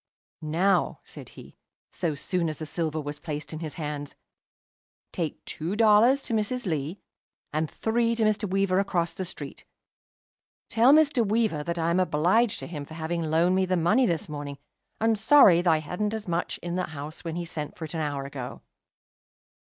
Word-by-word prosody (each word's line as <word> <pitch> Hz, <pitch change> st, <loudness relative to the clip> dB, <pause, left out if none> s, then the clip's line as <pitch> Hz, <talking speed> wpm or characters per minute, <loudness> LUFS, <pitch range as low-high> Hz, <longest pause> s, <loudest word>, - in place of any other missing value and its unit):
"Now," 175 Hz, +5 st, +1 dB
said -, -, -12 dB
he, -, -, -13 dB, 0.3 s
so 165 Hz, -5 st, -2 dB
soon 170 Hz, +3 st, -1 dB
as 155 Hz, -, -5 dB
the 155 Hz, -, -5 dB
silver 155 Hz, 0 st, -2 dB
was 145 Hz, 0 st, -5 dB
placed 150 Hz, -1 st, -5 dB
in 155 Hz, -, -5 dB
his 160 Hz, -3 st, -6 dB
hands, 150 Hz, -2 st, -5 dB, 1.0 s
"take 165 Hz, -5 st, -4 dB
two 170 Hz, +6 st, -4 dB
dollars 225 Hz, +5 st, +5 dB
to -, -, -4 dB
Mrs. 225 Hz, +3 st, -1 dB
Lee, 160 Hz, +1 st, -2 dB, 0.5 s
and 155 Hz, 0 st, 0 dB
three 230 Hz, +1 st, 0 dB
to 225 Hz, -, 0 dB
Mr. 215 Hz, -1 st, +1 dB
Weaver 195 Hz, 0 st, +2 dB
across 175 Hz, -4 st, 0 dB
the 185 Hz, -, -4 dB
street. 145 Hz, -5 st, -7 dB, 1.1 s
Tell 235 Hz, +4 st, +5 dB
Mr. 290 Hz, -5 st, +5 dB
Weaver 215 Hz, -8 st, +1 dB
that 170 Hz, 0 st, -2 dB
I 165 Hz, 0 st, +1 dB
am 175 Hz, -, +2 dB
obliged 185 Hz, +7 st, +2 dB
to -, -, -5 dB
him 150 Hz, -4 st, -6 dB
for 160 Hz, +2 st, -11 dB
having 165 Hz, +1 st, -2 dB
loaned 165 Hz, +3 st, +2 dB
me 190 Hz, 0 st, +2 dB
the 185 Hz, 0 st, +1 dB
money 215 Hz, +10 st, +3 dB
this 165 Hz, -4 st, -1 dB
morning, 145 Hz, -2 st, -6 dB, 0.4 s
and 225 Hz, -1 st, +2 dB
sorry 205 Hz, -11 st, +7 dB
that 175 Hz, -, +2 dB
I 160 Hz, -, +4 dB
hadn't 180 Hz, +8 st, -2 dB
as 220 Hz, -3 st, -6 dB
much 175 Hz, 0 st, -1 dB
in 175 Hz, +1 st, -3 dB
the 185 Hz, -, -1 dB
house 155 Hz, +1 st, -8 dB
when 165 Hz, -1 st, -4 dB
he 175 Hz, 0 st, -3 dB
sent 150 Hz, -3 st, -6 dB
for 160 Hz, -, -5 dB
it 155 Hz, -, -8 dB
an 165 Hz, -, -2 dB
hour 145 Hz, -3 st, -2 dB
ago." 135 Hz, -3 st, -7 dB
170 Hz, 190 wpm, -27 LUFS, 155-210 Hz, 1.1 s, sorry